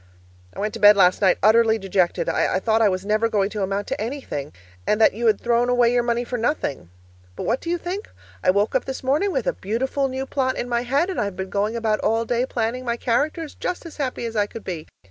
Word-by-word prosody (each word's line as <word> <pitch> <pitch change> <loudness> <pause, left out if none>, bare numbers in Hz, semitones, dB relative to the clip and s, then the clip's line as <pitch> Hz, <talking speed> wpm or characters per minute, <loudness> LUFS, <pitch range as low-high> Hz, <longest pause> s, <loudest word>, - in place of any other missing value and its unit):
I - - -8
went 210 +1 -2
to 230 - -6
bed 205 -1 +7
last 185 0 +4
night 190 -3 +4
utterly 220 +1 +5
dejected; 190 -3 0
I - - +1
thought 220 +2 +1
I 215 - +5
was 185 0 -3
never 215 +2 +1
going 205 -2 0
to 210 - -4
amount 195 +1 -1
to - - -3
anything, 220 - -4 0.4
and 210 - +2
that 220 - +5
you 230 +3 -1
had 215 -2 +3
thrown 240 +1 +1
away 245 -1 +3
your 245 - +3
money 240 0 0
for 245 0 -4
nothing. 220 - -2 0.5
But - - -5
what 240 +3 0
do 335 - -5
you 350 - +1
think? 365 +5 -5 0.3
I - - +3
woke 200 +3 +2
up 260 - +1
this 265 0 -5
morning 295 +10 +1
with - - -1
a - - +1
beautiful 260 +7 -1
new 265 0 -4
plot 260 -1 -1
in 245 - -3
my 240 -1 0
head, 280 +9 0
and - - -2
I've 200 -2 -3
been 190 +1 -5
going 210 +3 0
about 220 -2 0
all 225 +1 +1
day 245 +2 0
planning 240 +1 -2
my 235 -1 -2
characters, 295 +7 -1
just 360 - -4
as 330 - -10
happy 255 -4 -3
as 230 -1 -5
I 205 -1 +2
could 225 - -9
be. 170 -4 -6
230 Hz, 250 wpm, -23 LUFS, 205-260 Hz, 0.5 s, bed